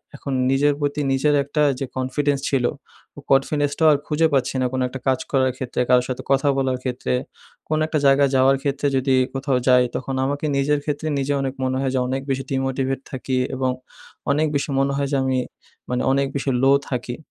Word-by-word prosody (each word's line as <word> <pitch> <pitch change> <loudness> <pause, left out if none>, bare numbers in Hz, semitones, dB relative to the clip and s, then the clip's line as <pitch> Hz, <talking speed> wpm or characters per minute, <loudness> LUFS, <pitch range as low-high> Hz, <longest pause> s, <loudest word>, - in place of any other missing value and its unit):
এখন 140 0 -5 0.2
নিজের 145 +2 +3
প্রতি 145 0 -1
নিজের 145 +2 +2
একটা 145 +2 -2 0.2
যে 135 - -2
confidence 135 +2 -1
ছিল, 130 -3 +1 0.5
ও - - -6
confidence 145 +1 +2
টাও 160 - +5
আর - - +2
খুঁজে 160 +1 +2
পাচ্ছি 135 -1 +1
না। - - +1
কোনো 130 0 0
একটা 135 +1 -7
কাজ 130 -1 +2
করার 130 -2 +2
ক্ষেত্রে, 125 -1 -2
কারো 125 0 +5
সাথে 130 - -4
কথা 135 +1 +3
বলার 130 -1 0
ক্ষেত্রে, 125 -1 -2 0.6
কোনো 155 0 +1
একটা 155 -1 0
জায়গায় 140 0 +5
যাওয়ার 135 +1 +4
ক্ষেত্রে। 140 0 0
যদি 130 0 +2 0.2
কোথাও 135 -1 0
যাই 125 -1 +6
তখন 130 +1 -3
আমাকে 145 +2 -2
নিজের 145 +2 +2
ক্ষেত্রে 150 +1 -3
নিজে 135 +1 0
অনেক 135 -1 -2
মনে 130 0 0
হয় 135 -1 0
যে 130 - +2
অনেক 135 +1 -2
বেশি 135 0 -1
demotivate 135 0 -1
থাকি 130 0 -2 0.2
এবং 130 0 0 0.6
অনেক 155 +2 +2
বেশি 140 - -1
মনে 135 0 +1
হয় 140 0 0
যে - - +3
আমি 130 -1 0 0.5
মানে 125 0 0
অনেক 140 0 +2
বেশি 140 0 -1
লো 135 - +6 0.2
থাকি। 120 -1 -3
135 Hz, 200 wpm, -22 LUFS, 130-145 Hz, 0.6 s, যাই